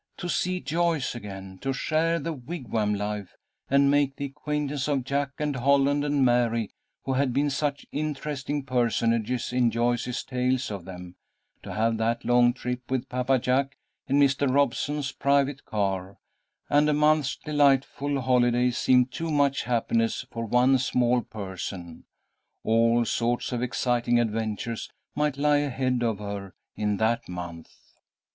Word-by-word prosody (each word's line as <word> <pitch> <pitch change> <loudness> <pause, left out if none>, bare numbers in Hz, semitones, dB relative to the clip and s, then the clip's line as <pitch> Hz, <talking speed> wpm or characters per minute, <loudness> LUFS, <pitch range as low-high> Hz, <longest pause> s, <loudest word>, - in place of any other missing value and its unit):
To 175 - -5
see 180 +1 0
Joyce 165 -3 0
again, 95 -4 -8
to 135 +5 -2
share 165 +4 +1
the 165 +1 -3
wigwam 120 -7 -2
life, 105 -2 -4 0.3
and 140 +1 +4
make 140 -1 +2
the 140 - -4
acquaintance 145 0 -3
of 140 -3 0
Jack 140 +2 -1
and 150 -2 -1
Holland 140 +2 +3
and 145 -2 +2
Mary, 115 -3 +2 0.3
who 135 - -1
had 135 0 +1
been 145 +2 +1
such 145 0 -2
interesting 145 -1 -3
personages 120 -1 0
in 125 -1 +3
Joyce's 120 +2 -1
tales 125 -1 -1
of 100 -4 -6
them, 90 -1 -9 0.4
to - - -7
have 115 +1 +1
that 115 +1 -1
long 120 0 +5
trip 125 0 -5
with 130 0 -2
Papa 125 +1 +1
Jack 135 +3 0 0.3
in 140 +2 +2
Mr. 140 -1 +3
Robeson's 140 +1 0
private 140 0 +1
car, 95 -2 -2 0.5
and 150 +1 +3
a - - +3
month's 150 -2 +3
delightful 140 -1 +1
holiday, 125 0 +3
seemed 125 +1 +3
too 165 +5 -4
much 140 -2 +1
happiness 115 0 0
for 115 -1 -4
one 125 +3 +4
small 125 -1 +2
person. 95 -5 -7 0.6
All 115 +1 +3
sorts 120 +3 -1
of 120 -1 -2
exciting 120 -1 +1
adventures 110 0 -2 0.2
might 150 -2 0
lie 145 +1 +3
ahead 130 -3 0
of 115 -3 0
her 100 -2 -6 0.2
in 105 -1 -1
that 115 +1 0
month. 85 -2 -7
125 Hz, 145 wpm, -26 LUFS, 115-140 Hz, 0.6 s, long